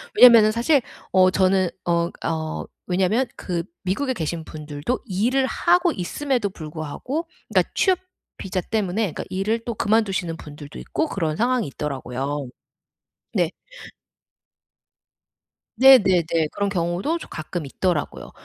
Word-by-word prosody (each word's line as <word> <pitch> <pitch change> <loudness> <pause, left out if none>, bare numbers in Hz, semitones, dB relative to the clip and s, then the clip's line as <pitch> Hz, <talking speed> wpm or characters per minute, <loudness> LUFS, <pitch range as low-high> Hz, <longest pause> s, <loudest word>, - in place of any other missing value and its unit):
왜냐면은 230 - +8
사실 245 +5 +3 0.3
어 185 0 +5
저는 190 -1 +3 0.2
어 170 0 +1 0.2
어 160 -1 -3 0.2
왜냐면 190 +8 +1
그 175 -2 -3 0.2
미국에 260 +9 -1
계신 165 -5 -3
분들도 150 - -4
일을 240 +6 +1
하고 350 +3 +3
있음에도 240 +4 -1
불구하고 160 - -5 0.3
그니까 - - +3
취업 375 -2 +3 0.4
비자 185 -1 -3
때문에 215 +2 -1
그니까 - - -5
일을 210 +5 -1
또 235 - -3
그만두시는 200 -6 0
분들도 145 -1 -10
있고 320 - -2
그런 160 -5 -1
상황이 245 -1 +1
있더라고요. 140 0 -4 0.9
네. - - +2 2.3
네네네. 200 -10 +6 0.3
그런 200 0 -1
경우도 180 - -1
조 - - -10
가끔 155 +1 -5
있더라고요. 160 +2 -2
190 Hz, 285 characters per minute, -23 LUFS, 165-240 Hz, 2.3 s, 왜냐면은